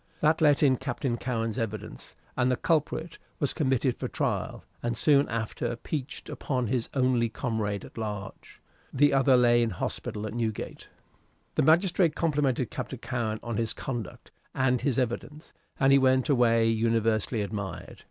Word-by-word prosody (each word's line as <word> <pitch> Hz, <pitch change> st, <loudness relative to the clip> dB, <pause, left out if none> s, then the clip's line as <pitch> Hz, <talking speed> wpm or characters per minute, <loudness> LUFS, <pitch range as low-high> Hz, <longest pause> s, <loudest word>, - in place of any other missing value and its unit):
That 155 Hz, +2 st, +2 dB
let 150 Hz, -1 st, +4 dB
in 130 Hz, -3 st, +4 dB
Captain 135 Hz, -1 st, -2 dB
Cowen's 115 Hz, -1 st, -2 dB
evidence, 110 Hz, -1 st, -6 dB, 0.2 s
and 125 Hz, 0 st, +2 dB
the 125 Hz, -, +2 dB
culprit 160 Hz, +3 st, -1 dB, 0.2 s
was 145 Hz, -, +1 dB
committed 130 Hz, -4 st, 0 dB
for -, -, -2 dB
trial, -, -, -2 dB, 0.2 s
and 120 Hz, 0 st, -2 dB
soon 145 Hz, -2 st, +4 dB
after 115 Hz, +1 st, -2 dB
peached 140 Hz, +3 st, -5 dB
upon 130 Hz, -3 st, -2 dB
his 120 Hz, +1 st, -1 dB
only 125 Hz, -3 st, +2 dB
comrade 110 Hz, -3 st, -2 dB
at -, -, -10 dB
large. 105 Hz, -3 st, -6 dB, 0.3 s
The 145 Hz, +2 st, +3 dB
other 135 Hz, -1 st, +5 dB
lay 120 Hz, -1 st, +5 dB
in 115 Hz, -, +1 dB
the 90 Hz, -, -7 dB
hospital 105 Hz, +4 st, -3 dB
at 110 Hz, -, -5 dB
Newgate. 115 Hz, -2 st, -4 dB, 0.6 s
The -, -, +1 dB
magistrate 170 Hz, +1 st, +3 dB
complimented 145 Hz, -6 st, 0 dB
Captain 130 Hz, -, -5 dB
Cowen 115 Hz, -2 st, -3 dB
on 115 Hz, -2 st, -3 dB
his 115 Hz, -1 st, 0 dB
conduct 120 Hz, -7 st, -6 dB, 0.2 s
and 130 Hz, -1 st, +2 dB
his 135 Hz, -5 st, 0 dB
evidence, 135 Hz, +5 st, -3 dB, 0.3 s
and 135 Hz, -1 st, +4 dB
he 140 Hz, -, +7 dB
went 130 Hz, +1 st, +3 dB
away 115 Hz, -4 st, +4 dB
universally 115 Hz, -1 st, +1 dB
admired. 100 Hz, -1 st, -6 dB
125 Hz, 160 wpm, -28 LUFS, 115-135 Hz, 0.6 s, he